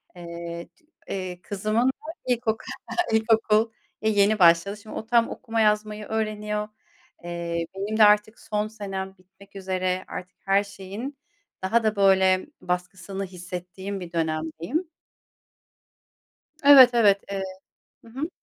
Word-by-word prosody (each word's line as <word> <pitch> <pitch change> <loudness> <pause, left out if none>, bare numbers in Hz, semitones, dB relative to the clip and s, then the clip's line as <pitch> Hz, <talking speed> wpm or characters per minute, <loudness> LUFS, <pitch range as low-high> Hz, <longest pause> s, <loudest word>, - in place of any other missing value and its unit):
eee, 170 -1 -7
c 345 -4 -32 0.2
eee, 185 -2 -4
kızımın 215 +6 0
da 265 - +4 0.4
ilkoku 235 -3 0 0.5
ilkokul 220 0 +3 0.3
e, 220 - +2
yeni 210 0 +3
başladı. 175 +4 +5
Şimdi 215 +1 -11
o 220 - -5
tam 235 0 +3
okuma 225 0 -2
yazmayı 210 0 +1
öğreniyor. 210 -1 -2 0.6
Eee, 170 -1 -3
benim 205 +3 -3
de 220 - +7
artık 210 +1 +4
son 210 -1 -2
senem 195 -3 -6
bitmek 190 +2 -21
üzere, 185 -1 -2
artık 185 0 -8
her 195 +1 +3
şeyin 200 +8 -7 0.5
daha 225 +4 +2
da, 215 0 +1
böyle, 190 0 +4
baskısını 180 +2 -3
hissettiğim 185 +2 -7
bir 175 -2 -8
dönemdeyim. 165 - -2 1.8
Evet, 275 -3 +10
evet, 205 -4 +5
eee, 195 -1 -2 0.6
hı 230 - -14
hı. 280 +7 -3
200 Hz, 125 wpm, -25 LUFS, 185-220 Hz, 1.8 s, Evet